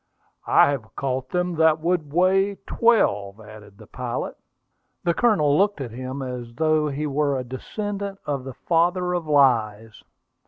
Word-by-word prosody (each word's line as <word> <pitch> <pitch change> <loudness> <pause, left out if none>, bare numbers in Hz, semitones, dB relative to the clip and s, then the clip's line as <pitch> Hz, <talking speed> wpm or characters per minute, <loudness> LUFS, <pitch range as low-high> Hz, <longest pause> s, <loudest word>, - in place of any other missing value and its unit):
"I - - +5
have 120 -6 -6
caught 130 -1 -3
them 180 +2 -1
that 160 -1 +4
would 160 -3 -1
weigh 190 +4 +2
twelve," 105 - +1
added 105 -2 -14
the - - -14
pilot. - - -5 0.7
The 170 - +2
Colonel 165 -11 +3
looked 200 +2 +2
at 130 -4 -5
him 130 +3 -6
as 125 -2 -7
though 155 0 +2
he 145 +1 -3
were 145 -1 0
a 130 - -3
descendant 200 - -5
of 140 -3 -2
the 130 -1 -8
father 180 +3 +1
of 175 -3 -3
lies. 115 -7 +2
145 Hz, 155 wpm, -23 LUFS, 125-180 Hz, 0.7 s, I